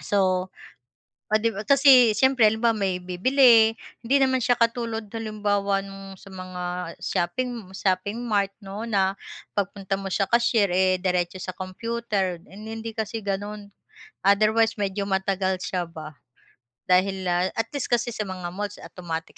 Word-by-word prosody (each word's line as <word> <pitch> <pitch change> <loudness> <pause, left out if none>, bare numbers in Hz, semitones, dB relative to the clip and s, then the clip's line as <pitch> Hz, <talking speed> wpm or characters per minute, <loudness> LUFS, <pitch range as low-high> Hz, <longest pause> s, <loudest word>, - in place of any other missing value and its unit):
So. 185 -2 +1 0.9
'di 225 +1 +3
ba 210 - -4
kasi 265 -4 +7
siyempre 260 -2 +4
halimbawa 225 +1 +1
may 190 -2 0
bibili 225 +4 +5 0.3
hindi 270 +4 +3
naman 260 -1 +3
siya 245 +1 +3
katulad 230 -2 -1
halimbawa 205 -3 -1 0.4
sa 195 - -14
mga 185 -1 -7 0.4
shopping 235 +1 -2
shopping 195 +4 -1
mart 205 -4 0
'no 200 +3 -6
na 195 -2 +1 0.4
pagpunta 195 -1 -2
mo 195 - -6
sa 195 - +2
cashier 235 -4 +3
eh, 185 +1 +3
diretso 180 0 0
sa - - -4
computer, 195 -1 -3
hindi 220 +3 -7
kasi 220 +1 -3
gano'n. 205 +1 -4 0.6
Otherwise 215 +3 +4
medyo 200 0 -1
matagal 190 -1 0
siya 180 -2 -2
ba, 155 -2 -9 0.7
dahil 190 +1 +2
la 175 +1 +2
at 225 0 -2
least 285 - -2
kasi 240 0 +1
sa 210 -3 -4
mga 185 -2 -5
malls 205 +1 -4
automatic 165 -3 -7
200 Hz, 140 wpm, -25 LUFS, 185-225 Hz, 0.9 s, kasi